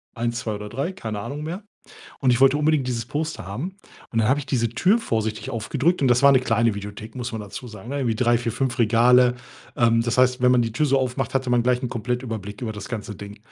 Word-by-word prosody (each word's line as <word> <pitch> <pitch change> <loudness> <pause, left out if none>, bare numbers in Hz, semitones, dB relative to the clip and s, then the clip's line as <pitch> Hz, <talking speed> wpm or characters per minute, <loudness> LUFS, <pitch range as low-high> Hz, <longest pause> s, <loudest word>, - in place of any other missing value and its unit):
1, 120 +1 -2
2 110 -4 -3
oder 105 0 -7
3, 135 - -3
keine 110 - -5
Ahnung 145 +8 -5
mehr. 175 +6 -5 0.6
Und 130 - +2
ich 120 - +1
wollte 135 +1 +6
unbedingt 150 -3 +1
dieses 115 -2 -2
Poster 150 - -4
haben. 150 - -5 0.3
Und 115 - -1
dann 110 +1 +2
habe 140 +3 +2
ich 140 - -9
diese 115 -3 0
Tür 185 - +2
vorsichtig 110 - -2
aufgedrückt 140 - 0
und 135 - +4
das 120 +1 +3
war 140 - +8
'ne 130 - +5
kleine 115 -2 +1
Videothek, 105 +2 -8
muss 125 -1 -4
man 110 -2 -5
dazu 110 +5 -8
sagen, 110 +3 -10
ne? 140 - -2
Irgendwie 120 -5 0
3, 120 0 +3
4, 120 0 -2
5 130 +1 -2
Regale, 120 +2 +5 0.4
ähm, 115 -1 +3
das 120 +1 -1
heißt, 125 0 +3
wenn 125 - +5
man 125 -1 +4
die 115 - -3
Tür 150 +7 +1
so 135 -1 +3
aufmacht, 130 0 -2
hatte 130 -1 0
man 120 -1 +3
gleich 125 +1 +1
'n - - -1
Komplettüberblick 115 -2 -4
über 110 - -3
das 105 -1 -8
ganze 105 -3 -5
Ding. 100 +2 -10
120 Hz, 250 wpm, -23 LUFS, 115-135 Hz, 0.6 s, war